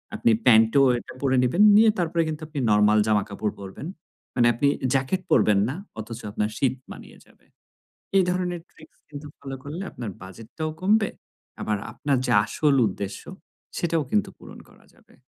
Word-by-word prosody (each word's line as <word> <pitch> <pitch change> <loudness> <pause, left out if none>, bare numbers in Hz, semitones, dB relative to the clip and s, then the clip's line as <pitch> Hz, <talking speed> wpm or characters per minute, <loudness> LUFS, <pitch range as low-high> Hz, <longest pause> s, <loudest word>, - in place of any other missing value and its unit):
আপনি 115 - +2
প্যান্ট 110 -2 +6
ও - - +6 0.2
একটা - - -12
পরে 135 -2 +1
নিবেন, 125 +10 +1
নিয়ে 220 +1 +6
তারপরে 170 -1 0
কিন্তু 155 -1 -5
আপনি 150 -2 -5
নরমাল 105 0 +4
জামাকাপড় 105 0 -1
পরবেন। 100 +9 -8 0.5
মানে 120 -2 +4
আপনি 130 +5 +1 0.3
জ্যাকেট 135 +8 0
পরবেন 105 -2 +4
না 135 - -4 0.2
অথচ 110 +1 -7
আপনার 105 +1 -1
শীত 130 -2 +1 0.2
মানিয়ে - - -12
যাবে। - - -26 0.7
এ - - +6
ধরনের 180 -1 -2
ট্রিকস 155 - -19
কিন্তু 145 0 -9
ফলো 135 -1 -7
করলে 155 +7 -6
আপনার 120 -4 -6
বাজেট 95 +4 -11
টাও 155 -1 -2
কমবে, 205 +2 +2 0.5
আবার 105 -1 -1
আপনার 140 -2 -1
যে - - -1
আসল 150 -2 +1
উদ্দেশ্য 100 0 -6 0.6
সেটাও 165 -2 0
কিন্তু 105 - +1
পূরণ - - -13
করা - - -22
যাবে। - - -25
135 Hz, 170 wpm, -24 LUFS, 110-160 Hz, 0.7 s, প্যান্ট